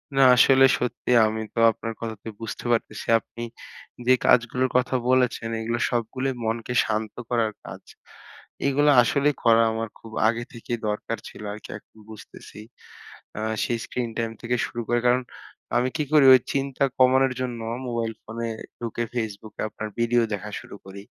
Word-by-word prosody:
না 135 - +4
আসলে 135 +2 +6
সত্যিই 125 0 +1
আমি 110 +1 -3
তো - - -2
আপনার 115 +1 -6
কথাতে 115 -1 -6
বুঝতে 115 +1 -7
পারতেছি। 115 - -2
আপনি 115 - -12 0.7
যে 130 - +7
কাজগুলোর 125 +2 +3
কথা 125 +1 0
বলেছেন 125 -3 +2
এইগুলা 115 +1 -2
সবগুলাই 130 +3 -2
মনকে 115 +2 -2
শান্ত 110 0 -2 0.2
করার 115 -3 +1
কাজ। - - -9 0.9
এগুলো 145 +2 +3
আসলেই 140 +5 +1
করা 115 -1 +5
আমার 110 0 -3
খুব 115 - -13 0.2
আগে 115 +1 0
থেকেই 120 0 -4
দরকার 105 +2 -3
ছিল - - -11
আরকি 105 - -11
এখন - - -23
বুঝতেছি। 110 -1 -12 0.8
আ - - -3 0.2
সেই 120 - -1
স্ক্রিন 125 -2 -3
টাইম 115 -1 -1
থেকে 120 +1 0
শুরু 120 - -6
করে। 120 0 +2
কারণ 125 +1 +3 0.5
আমি 125 +1 +2
কি 155 - 0
করি? 150 -2 +6
ওই 130 - +6
চিন্তা 140 0 0
কমানোর 130 0 +4
জন্য 125 -2 -3 0.3
মোবাইল 115 -1 -2
ফোনে 115 +1 -5 0.3
ঢুকে 120 0 -3
Facebook 110 -2 -5
এ - - -1
আপনার 110 0 -6
ভিডিও 120 +1 +3
দেখা 105 +1 -5
শুরু - - -11
করি। 100 +1 -9
120 Hz, 160 wpm, -24 LUFS, 110-125 Hz, 0.9 s, যে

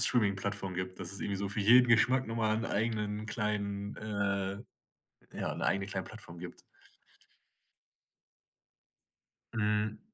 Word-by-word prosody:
Streamingplattform 100 -4 +2
gibt, 90 0 -4
dass 90 0 -4
es 100 - -6
irgendwie 100 - -1
so 100 0 -2
für 105 - -1
jeden 125 +5 +7
Geschmack 125 +3 +4
noch 115 +1 -4
mal 110 -1 +2
'n 115 - -2
eigenen 105 -1 -1
kleinen, 105 -1 -2
äh 100 -2 -1 0.8
ja, - - -2
'ne - - -3
eigene 100 0 +1
kleine 95 -1 -3
Plattform 100 -6 -10
gibt. 90 0 -9 2.9
Mhm. 105 -1 +1
105 Hz, 130 wpm, -32 LUFS, 100-110 Hz, 2.9 s, jeden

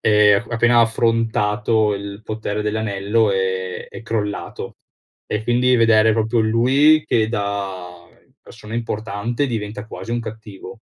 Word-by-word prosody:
e 105 -1 +5 0.2
appena 120 +1 +3
ha - - +7
affrontato 110 -2 +1
il 100 0 -7
potere 110 -1 -4
dell'anello 105 0 0
è 95 -1 -2
è - - -10
crollato. 105 -2 -4 0.5
E 105 - -2
quindi 125 +2 +2
vedere 110 -1 +4
proprio 110 +1 +1
lui 130 +8 +4
che 110 -1 +2
da 95 -5 -4 0.4
persona 105 +2 -11
importante 115 +2 -2
diventa 110 -3 -5
quasi 115 - -8
un 120 0 -1
cattivo, 110 0 -10
110 Hz, 125 wpm, -20 LUFS, 105-115 Hz, 0.5 s, ha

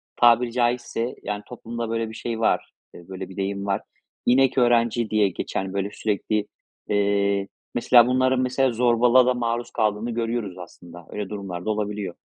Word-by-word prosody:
Tabiri 120 0 +4
caizse, 120 0 -1
yani, 105 0 -4
toplumda 120 -1 -6
böyle 115 -1 -1
bir - - -9
şey 115 0 -4
var, 115 - +1 0.2
e, 85 0 -13
böyle 95 -1 -6
bir 95 - -12
deyim 100 0 -2
var. 100 -1 0 0.4
İnek 130 +2 +4
öğrenci 120 -2 +3
diye 105 -2 +3
geçen 95 +1 -4
böyle 100 0 -1
sürekli, 105 0 -1 0.4
eee, 100 -1 +1 0.3
mesela 120 0 +6
bunların 130 0 +2
mesela 130 +1 +1
zorbalığa 120 +1 +4
da 125 - +3
maruz 120 -1 -2
kaldığını 110 +1 0
görüyoruz 115 -5 -3
aslında. 90 -1 -12
Öyle 105 -2 -4
durumlar 95 -4 -6
da - - -1
olabiliyor 105 -3 -3
115 Hz, 160 wpm, -24 LUFS, 100-120 Hz, 0.4 s, mesela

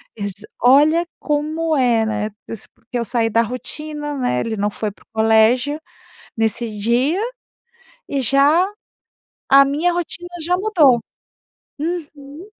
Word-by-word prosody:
Exa 205 -1 -5 0.2
Olha 295 +7 +5
como 310 +2 -1
é, 240 -4 +3
né? 215 -1 -2 0.2
Eu - - -5
sa 215 - -9
porque 240 +1 -6
eu 235 - -2
saí 230 0 0
da 230 +1 +3
rotina, 295 +5 -5
né, 185 - 0
ele 225 -1 -3
não 205 +1 0
foi 210 0 -4
pro - - -24
colégio 225 +6 +3 0.6
nesse 225 +1 0
dia, 245 - +1 0.9
e 280 -1 -1
já 280 - +4 0.8
a 275 +1 +7
minha 300 +6 +1
rotina 350 0 -4 0.2
já 355 +2 +2
mudou. 340 - +4 0.8
Uhum. 300 0 -6
275 Hz, 135 wpm, -20 LUFS, 225-310 Hz, 0.9 s, a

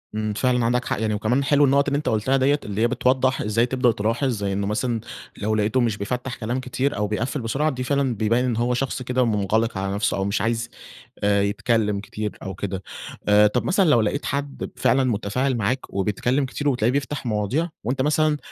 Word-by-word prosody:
إمم، 110 -1 -1
فعلًا 125 +1 +1
عندك 125 +1 +1
حَق - - -2
يعني، 110 -1 0
وكمان 120 +6 +1
حلو 145 +1 +4
النُقط 140 +1 +3
اللي 140 0 +1
أنت 150 - -1
قلتها 115 +5 +1
ديّة، 140 +3 +2
اللي 105 +1 -3
هي 120 - +4
بتوضّح 130 +1 +1
إزاي 110 +3 +2
تبدأ 125 -1 +2
تلاحظ، 115 +6 -1
زي 100 -4 -2
إنه 100 0 -1
مثلًا 115 +2 -1 0.4
لو 110 +1 -1
لقِيته 110 +4 +1
مش 110 -3 0
بيفتّح 125 +5 -3
كلام 120 +3 -3
كتير 130 +1 -2
أو 105 0 0
بيقفّل 120 +6 -2
بسرعة، 140 +7 0
دي 130 -3 -3
فعلًا 135 -2 0
بيبيّن 115 +4 +1
إن 120 -3 0
هو 120 +1 +1
شخص 130 0 -2
كده 125 0 +1
منغلق 110 0 0
على 95 0 -2
نفْسه 105 - 0
أو 95 - -1
مش 100 +1 0
عايز، 115 +1 -1 0.5
آآ 100 0 +3
يتكلم 105 0 +1
كتير 105 +1 -5
أو 95 -1 -5
كده. 95 -1 -4 0.4
آآ، 105 0 +6
طَب 125 +4 0
مثلًا 190 -3 +3
لو 120 -6 +5
لقِيت 110 +8 -1
حد 140 0 -3
ب - - -5
فعلًا 135 +1 +3
متفاعل 125 +3 0
معاك 120 +5 -2
وبيتكلم 115 +8 0
كتير 145 +2 -2
وبتلاقيه 120 -2 +1
بيفْتح 140 0 -2
مواضيع، 115 - 0
وأنت 130 +4 -1
مثلًا 150 +1 +2
120 Hz, 210 wpm, -23 LUFS, 105-130 Hz, 0.5 s, آآ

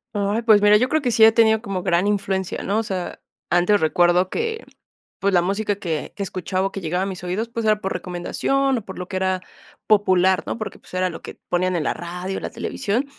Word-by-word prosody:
Ay, 205 +3 0
pues, 215 -3 +6
mira, 210 0 +6
yo 250 +4 +1
creo 315 - +1
que 255 - 0
sí 225 -1 +4
he 220 - +9
tenido 220 -1 +4
como 195 -4 -3
gran 180 0 +1
influencia, 195 -2 -1
¿no? 200 - -1
O 225 - +1
sea, 185 -4 -4 0.3
antes 180 +4 +3
recuerdo 175 +3 +3
que, 455 - -3 0.6
pues, 200 0 +1
la 175 - +5
música 200 +3 -1
que 165 -6 -4
que 200 - -4
escuchaba 185 0 -2
o 195 - -4
que 195 - -5
llegaba 180 +1 -1
a - - -1
mis 190 -2 -6
oídos, 205 +6 -2
pues, 230 -1 -3
era 215 -1 +3
por 190 - -2
recomendación 260 +9 -1
o 220 - -9
por 190 - -8
lo 180 - -5
que 190 - -5
era 185 0 0 0.4
popular, 190 -3 +3
¿no? - - -3
Porque, 215 -2 -6
pues, - - -16
era 185 0 +1
lo 165 - -8
que - - -9 0.2
ponían 180 +1 +1
en 160 - -1
la - - +1
radio, 180 +2 -5
en - - -8
la - - -3
televisión. 235 +2 -2
195 Hz, 240 wpm, -22 LUFS, 180-215 Hz, 0.6 s, he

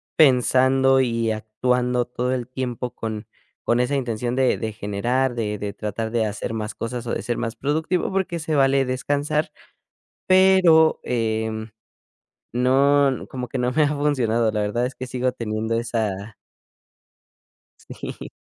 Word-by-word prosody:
pensando 130 -1 +4
y 115 -3 0
actuando 125 +3 0
todo 125 +1 -2
el 125 -2 -3
tiempo 125 -1 -4
con 110 -1 -5 0.4
con 120 - +2
esa 125 +3 +1
intención 120 -2 -2
de 130 -1 +2
de 110 -1 -3
generar, 120 +6 -1
de 105 -3 -2
de 100 -1 -4
tratar 110 +2 -4
de 115 -2 +1
hacer 105 +2 -4
más 105 -1 -4
cosas 120 +1 -5
o - - -1
de - - -2
ser 120 - -2
más 115 0 -3
productivo, 160 +9 -1
porque 185 -3 -1
se 155 -1 -2
vale 135 0 +3
descansar". 145 +4 -1 0.8
Pero, 185 -4 +5
em, 110 -2 -2 0.8
no, 135 +2 +3
como 125 -2 -5
que - - -4
no 125 0 0
me 155 +4 +2
ha - - +2
funcionado, 120 -6 +1
la 105 - -1
verdad 110 +4 0
es 130 - -6
que 130 - -6
sigo 125 0 -1
teniendo 110 -1 -3
esa 110 -3 -2 1.4
Sí. - - -8
125 Hz, 150 wpm, -23 LUFS, 110-135 Hz, 1.4 s, Pero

